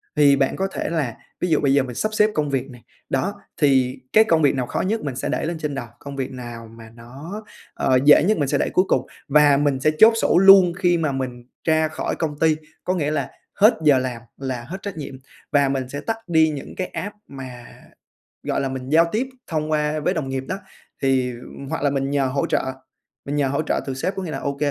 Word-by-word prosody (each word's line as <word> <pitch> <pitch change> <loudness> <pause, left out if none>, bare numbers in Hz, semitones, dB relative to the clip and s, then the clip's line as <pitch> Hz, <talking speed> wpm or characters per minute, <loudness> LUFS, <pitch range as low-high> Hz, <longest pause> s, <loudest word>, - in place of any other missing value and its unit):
Thì 145 -2 +5
bạn 135 -1 +1
có 195 - -1
thể - - -3
là 150 -9 -2 0.2
ví 180 - 0
dụ 155 - +3
bây 140 -2 +3
giờ 140 - +4
mình 125 -2 -7
sắp 215 - -1
xếp 215 0 +4
công 150 -1 0
việc 135 -1 -2
này, 125 -2 -13 0.3
đó, 180 +10 0 0.3
thì 130 -3 +3
cái 220 - +7
công 165 -7 +2
việc 145 -2 +3
nào 130 -2 -1
khó - - -2
nhất 220 +4 -1
mình 140 -4 -4
sẽ 135 - -3
để - - -1
lên 170 +1 -3
trên 150 -2 -4
đầu, 120 -3 -5
công 140 0 -8
việc 135 -2 -3
nào 120 -3 -8
mà 115 0 -13
nó, 140 - -9 0.3
ờ, 130 -1 +2
dễ 150 0 +7
nhất 215 +5 +2
mình 145 - 0
sẽ - - +1
để - - 0
cuối 185 - +3
cùng, - - +1 0.2
và 145 0 +5
mình 145 -2 +1
sẽ 155 +3 +3
chốt 225 +1 +8
sổ - - +3
luôn 190 -2 +8
khi 175 -2 +3
mà 155 -3 0
mình 130 -2 -4 0.2
ra 160 -1 +2
khỏi 155 - -3
công 150 -3 -3
ty, 160 -1 +3 0.3
có 185 - 0
nghĩa 150 -4 -1
là 145 -3 -2 0.3
hết 215 +4 +5
giờ 145 -3 +6
làm 125 -2 -4 0.2
là 130 -3 -4
hết 185 - -5
trách 200 -4 -6
nhiệm, 140 -3 -6 0.4
và 140 -1 +3
mình 130 -2 -2
sẽ 145 +2 -5
tắt 225 +7 -2
đi 160 -2 +4
những 145 -3 -7
cái 185 - -2
app 205 +2 -6
mà, 130 -3 -9 0.8
gọi - - -1
là, 135 - -1
mình 130 0 -6
giao 165 +3 +5
tiếp 240 +5 0 0.2
thông 155 -1 -2
qua 150 0 0
với 150 - 0
đồng 150 -5 -3
nghiệp 135 0 -3
đó. 190 - -3 0.5
Thì, 130 -2 +2
ừm, 125 +3 -10
hoặc - - -3
là 145 - +3
mình 135 0 -1
nhờ 140 -1 +1
hỗ 135 +2 -1
trợ, - - +1 0.6
mình 145 - -3
nhờ 145 -2 +1
hỗ 140 +3 0
trợ - - -1
từ 135 - -2
sếp, 185 +9 -2
có 190 - -4
nghĩa 170 - -5
là, - - -4
OK, 140 0 -3
145 Hz, 250 wpm, -22 LUFS, 130-160 Hz, 0.8 s, chốt